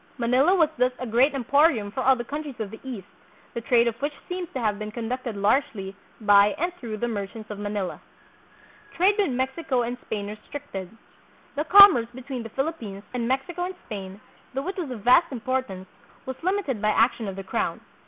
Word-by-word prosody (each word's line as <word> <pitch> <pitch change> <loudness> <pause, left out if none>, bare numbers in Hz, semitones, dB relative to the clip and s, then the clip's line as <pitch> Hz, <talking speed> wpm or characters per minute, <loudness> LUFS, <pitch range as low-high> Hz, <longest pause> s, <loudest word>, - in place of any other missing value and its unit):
Manila 255 +9 +3
was 325 -5 +4
thus 250 0 +3
a 255 - -5
great 250 +5 +3
em 265 - -2
porium 275 -7 +3
for 260 - -2
all 265 +1 +5
the 240 - -4
countries 285 0 -6
of 210 -3 -4
the 220 - -9
East, 240 -8 -6 0.5
the 235 - -4
trade 235 0 +3
of 235 - +1
which 290 +1 -1
seems 360 -1 -4
to 260 - -4
have 215 -3 0
been 215 0 -4
conducted 235 +1 -4
largely 200 -2 0 0.2
by 205 -1 +5
and 345 +2 -1
through 220 -3 -5
the 240 - -1
merchants 215 0 -5
of 205 - -6
Manila. 205 -2 -3 1.0
Trade 375 +4 +5
with 400 - +3
Mexico 260 +1 -1
and 245 +1 -4
Spain 205 -2 -3
Restricted. 210 -2 -7 0.7
The 300 +2 -1
com 400 +3 +10
merce 230 -3 -1
between 260 -1 -6
the 225 - -7
Philippines, 230 -7 -4
and 240 -2 -1
Mexico 270 +8 -1
and 370 +1 -5
Spain, 195 -3 -7 0.4
though 270 +4 -2
it 390 - -4
was 345 -7 -4
of 245 -4 -6
vast 250 +10 +5
importance, 245 -7 -3 0.4
was 260 - -4
limited 350 - -1
by 215 - +2
action 225 0 +2
of 195 - -4
the 195 - -6
crown. 190 - -2
245 Hz, 200 wpm, -25 LUFS, 215-280 Hz, 1.0 s, com